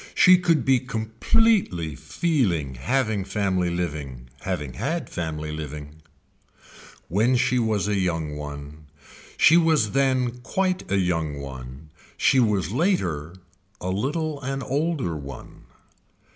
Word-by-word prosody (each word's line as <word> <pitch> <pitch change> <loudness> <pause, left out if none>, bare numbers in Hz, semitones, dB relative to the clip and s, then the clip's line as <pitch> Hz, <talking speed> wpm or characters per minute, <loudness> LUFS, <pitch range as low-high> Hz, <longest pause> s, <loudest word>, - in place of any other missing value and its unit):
She 185 -1 +7
could 170 -3 +2
be 130 -1 +4
completely 115 - +1
feeling 90 - 0
having 110 - 0
family 95 -2 0
living, 75 -8 -4
having 75 -4 -3
had 165 +4 -3
family 80 -3 -4
living. 75 0 -7 1.4
She 125 0 +2
was 110 -4 +1
then 105 0 0
a - - +1
young 80 -5 -1
one, 75 +1 -8 0.5
she 160 - +7
was 160 -11 +3
then 130 -3 +1
quite 185 +7 -1
a 100 - +3
young 80 -5 0
one, 65 +2 -9 0.3
she 135 - +4
was 100 -7 +1
later 95 - 0 0.4
a 90 - -4
little 145 - -2
an 135 0 -3
older 140 - -1
one. 70 -3 -9
95 Hz, 120 wpm, -24 LUFS, -, 1.4 s, She